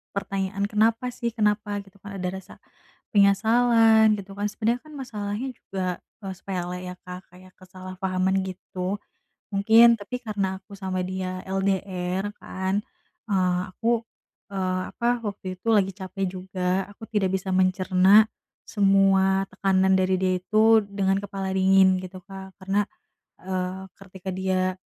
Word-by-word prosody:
pertanyaan, 195 Hz, 0 st, -2 dB
"Kenapa 225 Hz, +4 st, +1 dB
sih, 235 Hz, -1 st, -4 dB
kenapa?" 210 Hz, -1 st, +1 dB
Gitu 200 Hz, 0 st, -21 dB
kan, 200 Hz, 0 st, -9 dB
ada 185 Hz, -1 st, -3 dB
rasa 190 Hz, 0 st, -9 dB, 0.6 s
penyesalan 220 Hz, +2 st, +5 dB
gitu 195 Hz, 0 st, -10 dB
kan 205 Hz, -, -1 dB
sebenernya 230 Hz, +3 st, -1 dB
kan 310 Hz, -, -13 dB
masalahnya 220 Hz, -2 st, -4 dB
juga, 185 Hz, -2 st, -4 dB, 0.3 s
eee, 190 Hz, -1 st, -4 dB
sepele 180 Hz, -2 st, -4 dB
ya 180 Hz, -, -6 dB
Kak, 180 Hz, 0 st, -10 dB
kayak 185 Hz, +1 st, -16 dB
kesalahpahaman 185 Hz, 0 st, -2 dB
gitu, 185 Hz, +1 st, -5 dB, 0.5 s
mungkin 225 Hz, +4 st, +7 dB
tapi 205 Hz, +5 st, -5 dB
karena 195 Hz, -3 st, -1 dB
aku 200 Hz, +1 st, -16 dB
sama 190 Hz, -2 st, -3 dB
dia 185 Hz, 0 st, -4 dB
LDR 190 Hz, 0 st, -1 dB
kan, 190 Hz, +2 st, -2 dB, 0.5 s
eee, 180 Hz, -2 st, +2 dB
aku, 230 Hz, +3 st, 0 dB, 0.5 s
eee, 185 Hz, -2 st, -1 dB
apa 240 Hz, 0 st, 0 dB
waktu 200 Hz, -3 st, -5 dB
itu 205 Hz, -, -11 dB
lagi 200 Hz, -3 st, +3 dB
capek 190 Hz, +1 st, -4 dB
juga, 185 Hz, +1 st, -2 dB
aku 215 Hz, +2 st, -11 dB
tidak 205 Hz, -4 st, +1 dB
bisa 190 Hz, 0 st, -4 dB
mencerna 185 Hz, +2 st, +5 dB, 0.4 s
semua 195 Hz, -1 st, +3 dB
tekanan 190 Hz, -1 st, +2 dB
dari 185 Hz, 0 st, +2 dB
dia 185 Hz, 0 st, +1 dB
itu 220 Hz, +3 st, +5 dB
dengan 195 Hz, -1 st, +1 dB
kepala 195 Hz, -1 st, -4 dB
dingin 190 Hz, 0 st, +4 dB
gitu 185 Hz, 0 st, -8 dB
Kak, 190 Hz, -1 st, -10 dB
karena, 195 Hz, +1 st, 0 dB, 0.6 s
eee, 185 Hz, 0 st, -3 dB
ketika 190 Hz, -1 st, -11 dB
dia 185 Hz, 0 st, 0 dB
195 Hz, 135 wpm, -25 LUFS, 185-205 Hz, 0.6 s, mungkin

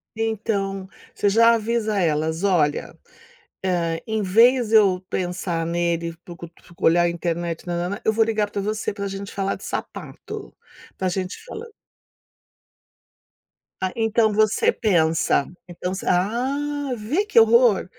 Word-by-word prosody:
Então, 200 Hz, -3 st, -2 dB, 0.3 s
você 205 Hz, -, +2 dB
já 230 Hz, +3 st, +5 dB
avisa 225 Hz, -1 st, -1 dB
elas: 160 Hz, -1 st, 0 dB
"Olha, 165 Hz, -7 st, +1 dB, 0.7 s
eh, 170 Hz, -3 st, -1 dB
em 220 Hz, -1 st, -1 dB
vez 230 Hz, +5 st, +4 dB
de 225 Hz, -, +6 dB
eu 195 Hz, -4 st, +4 dB
pensar 175 Hz, -2 st, -2 dB
nele, 170 Hz, 0 st, -1 dB
procu 170 Hz, -1 st, -10 dB, 0.4 s
olhar 175 Hz, +1 st, +5 dB
a 175 Hz, -, +3 dB
internet 170 Hz, 0 st, -3 dB
nã-nã-nã, 175 Hz, +3 st, -3 dB
eu 220 Hz, -, +3 dB
vou 225 Hz, +1 st, +3 dB
ligar 215 Hz, -2 st, -1 dB
para 205 Hz, -, -3 dB
você 215 Hz, 0 st, -2 dB
para 200 Hz, -1 st, -4 dB
gente 195 Hz, +1 st, -6 dB
falar 195 Hz, 0 st, -2 dB
de -, -, -13 dB
sapato, -, -, -7 dB, 0.4 s
para 190 Hz, -, -1 dB
gente 185 Hz, +1 st, -4 dB
falar" 465 Hz, -2 st, -8 dB, 2.2 s
Ah, 185 Hz, -, 0 dB
então 225 Hz, -1 st, +2 dB
você 215 Hz, -, +3 dB
pensa, 165 Hz, -, +1 dB, 0.2 s
então 180 Hz, +1 st, -5 dB
você 190 Hz, -, -7 dB
Ah, 265 Hz, +9 st, 0 dB
vê 255 Hz, -, -1 dB
que 415 Hz, -, +4 dB
horror? 225 Hz, -1 st, +5 dB
200 Hz, 135 wpm, -22 LUFS, 175-225 Hz, 2.2 s, de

